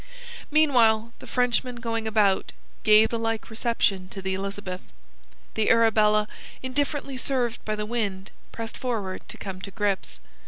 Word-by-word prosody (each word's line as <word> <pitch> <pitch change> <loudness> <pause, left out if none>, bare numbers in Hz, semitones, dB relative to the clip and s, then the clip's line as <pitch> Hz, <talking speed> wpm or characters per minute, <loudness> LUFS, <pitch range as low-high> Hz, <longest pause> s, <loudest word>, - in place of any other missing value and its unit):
Meanwhile, 235 -7 +4
the - - -11
Frenchmen 250 0 +1
going 230 -2 -2
about, 210 -3 +2 0.3
gave 215 +1 +6
the 230 - -2
like 225 0 -2
reception 220 -5 0
to 195 - -7
the 190 0 -2
Elizabeth. 195 -1 -4 0.7
The 220 -1 +1
Arabella, 215 -2 +4 0.4
indifferently 275 +1 -1
served 250 -3 0
by 215 - -1
the 210 0 -3
wind, 205 -4 -2 0.2
pressed 225 0 -6
forward 215 -7 -2
to - - -8
come 190 -2 -6
to 200 - -6
grips. 200 0 -2
220 Hz, 145 wpm, -26 LUFS, 200-240 Hz, 0.7 s, gave